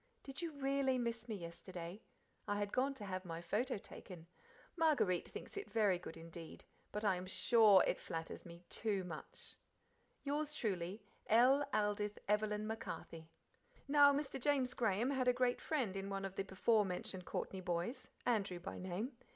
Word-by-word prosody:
Did 270 Hz, +3 st, -5 dB
you 335 Hz, -2 st, -2 dB
REALLY 275 Hz, -2 st, +1 dB
miss 235 Hz, -1 st, -2 dB
me 220 Hz, -, -1 dB
yesterday? 175 Hz, +1 st, -7 dB, 0.5 s
I 205 Hz, -, 0 dB
had 205 Hz, 0 st, -2 dB
gone 275 Hz, +2 st, +2 dB
to 215 Hz, -6 st, -6 dB
have 185 Hz, -1 st, -3 dB
my 165 Hz, -2 st, -5 dB
photo 210 Hz, +9 st, 0 dB
taken. 180 Hz, -3 st, -10 dB, 0.5 s
Marguerite 265 Hz, -, +3 dB
thinks -, -, -8 dB
it 405 Hz, 0 st, -5 dB
very 205 Hz, -5 st, +3 dB
good 165 Hz, -2 st, -8 dB
indeed, 165 Hz, 0 st, -8 dB, 0.3 s
but 210 Hz, +1 st, -2 dB
I 190 Hz, -3 st, +3 dB
am 180 Hz, +1 st, -6 dB
SURE 200 Hz, +2 st, +6 dB
it -, -, 0 dB
flatters 165 Hz, -1 st, -5 dB
me 170 Hz, 0 st, -11 dB
TOO 205 Hz, -4 st, 0 dB
much. 165 Hz, -4 st, -8 dB, 0.7 s
Yours 295 Hz, +1 st, -1 dB
truly, 195 Hz, -, -2 dB, 0.2 s
L. 255 Hz, +6 st, +6 dB
Aldith 210 Hz, -1 st, 0 dB
Evelyn 210 Hz, 0 st, +1 dB
MacCarthy." 165 Hz, -7 st, -5 dB, 0.6 s
Now 285 Hz, 0 st, +8 dB
Mr. 280 Hz, -2 st, -2 dB
James 265 Hz, -2 st, +2 dB
Graham 225 Hz, +2 st, +1 dB
had 260 Hz, -2 st, +1 dB
a 250 Hz, -, +6 dB
great 250 Hz, 0 st, +1 dB
friend 255 Hz, -11 st, 0 dB
in 195 Hz, 0 st, -3 dB
one 195 Hz, 0 st, -2 dB
of 195 Hz, 0 st, -5 dB
the 195 Hz, -, -1 dB
before 210 Hz, +3 st, +3 dB
mentioned 185 Hz, -1 st, -4 dB
Courtney 190 Hz, -, -3 dB
boys, 180 Hz, +9 st, -2 dB, 0.2 s
Andrew 200 Hz, -7 st, +1 dB
by 195 Hz, +3 st, -6 dB
name. 185 Hz, +8 st, -3 dB
210 Hz, 165 wpm, -38 LUFS, 185-255 Hz, 0.7 s, Now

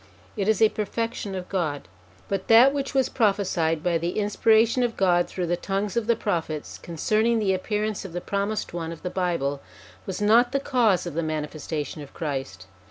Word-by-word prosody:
It 200 Hz, -3 st, -1 dB
is 220 Hz, 0 st, +3 dB
a 220 Hz, -, +6 dB
perfection 215 Hz, -1 st, -3 dB
of 185 Hz, -1 st, -5 dB
God. 155 Hz, -, -2 dB, 0.4 s
But 195 Hz, -1 st, -3 dB
that 240 Hz, +5 st, +7 dB
which 275 Hz, -1 st, -3 dB
was 265 Hz, -1 st, +3 dB
prophesied 190 Hz, -8 st, +1 dB
by 170 Hz, -2 st, +1 dB
the 170 Hz, +2 st, -3 dB
in 205 Hz, -1 st, 0 dB
spiration 225 Hz, +3 st, +3 dB
of 240 Hz, -2 st, -1 dB
God 175 Hz, -2 st, +3 dB
through 180 Hz, -, -3 dB
the 175 Hz, +1 st, 0 dB
tongues 195 Hz, +3 st, -3 dB
of 235 Hz, -2 st, 0 dB
the 235 Hz, -, +4 dB
Prophets, 165 Hz, -8 st, -3 dB
concerning 215 Hz, +8 st, +1 dB
the 205 Hz, -3 st, +1 dB
appearance 210 Hz, +2 st, -2 dB
of 195 Hz, -, -8 dB
the 175 Hz, -, -3 dB
Promised 200 Hz, +2 st, -2 dB
One 165 Hz, -1 st, -4 dB
of 165 Hz, -, -10 dB
the 180 Hz, -, -3 dB
Bible, 165 Hz, -7 st, -1 dB, 0.5 s
was 190 Hz, 0 st, -4 dB
not 230 Hz, +5 st, +4 dB
the 275 Hz, -, +2 dB
cause 235 Hz, -10 st, +2 dB
of 175 Hz, -, -5 dB
the 165 Hz, -, -1 dB
manifestation 155 Hz, -1 st, -4 dB
of 145 Hz, -, -12 dB
Christ. 135 Hz, -, -4 dB
195 Hz, 195 wpm, -25 LUFS, 165-220 Hz, 0.5 s, that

